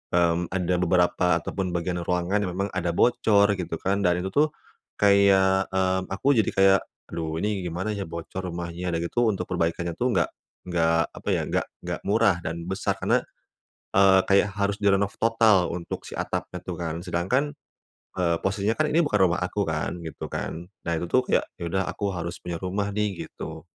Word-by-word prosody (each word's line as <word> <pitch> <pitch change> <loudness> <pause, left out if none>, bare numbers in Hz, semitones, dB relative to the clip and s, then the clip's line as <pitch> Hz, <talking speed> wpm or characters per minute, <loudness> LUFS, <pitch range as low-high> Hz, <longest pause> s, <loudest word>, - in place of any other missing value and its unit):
mmm, 85 0 +2
ada 90 -1 0
beberapa 90 0 +2 0.2
ataupun 95 -3 -3
bagian 90 +1 -1
ruangan 90 +3 0
yang 90 - -5
memang 100 +2 -2
ada 85 -1 -2
bocor 105 -2 +4
gitu 85 -2 -3
kan 95 +4 -1
dan 90 -2 +1
itu 95 - -3
tuh 150 +6 +4 0.5
kayak, 95 -1 +4
mmm, 95 0 0
aku 115 +9 +1
jadi 110 - +2
kayak, 95 0 +6 0.3
"Aduh 80 -1 -3
ini 105 -2 0
gimana 90 +5 -3
ya 100 -3 -4
bocor 85 +2 -6
rumahnya." 85 +1 -5
Udah 80 - 0
gitu 120 +7 +1
untuk 95 -4 0
perbaikannya 85 0 0
tuh 125 -3 +1
nggak 85 - +2 0.4
nggak 85 -1 +3
apa - - -13
ya, - - 0
nggak - - +1 0.2
nggak - - -3
murah, 105 -3 +3
dan 85 +1 -4
besar, 95 +1 -1
karena, - - +2 0.8
eee, 95 -1 +6
kayak 100 +1 +4
harus 100 0 0
direnov 100 0 +3
total 110 -5 +4
untuk 85 -1 -5
si - - -8
atapnya - - -3
tuh - - -5
kan. 85 -1 -3
Sedangkan, 95 +12 0 0.7
eee, 85 -2 +2
posisinya 100 +3 0
kan 155 0 +2
ini 165 - +4
bukan 105 -7 +1
rumah 90 - -1
aku 100 +3 -1
kan, 80 +2 -2
gitu 80 - -6
kan. 85 +2 -4 0.2
Nah, - - 0
itu 85 - -2
tuh 130 - +5
kayak, - - +2
"Ya - - -5
udah, 95 +2 0
aku 100 -2 -2
harus 85 +1 -4
punya 85 -1 -5
rumah 100 +2 -1
nih." 105 -3 -1
Gitu. 80 0 -8
95 Hz, 185 wpm, -25 LUFS, 85-100 Hz, 0.8 s, kayak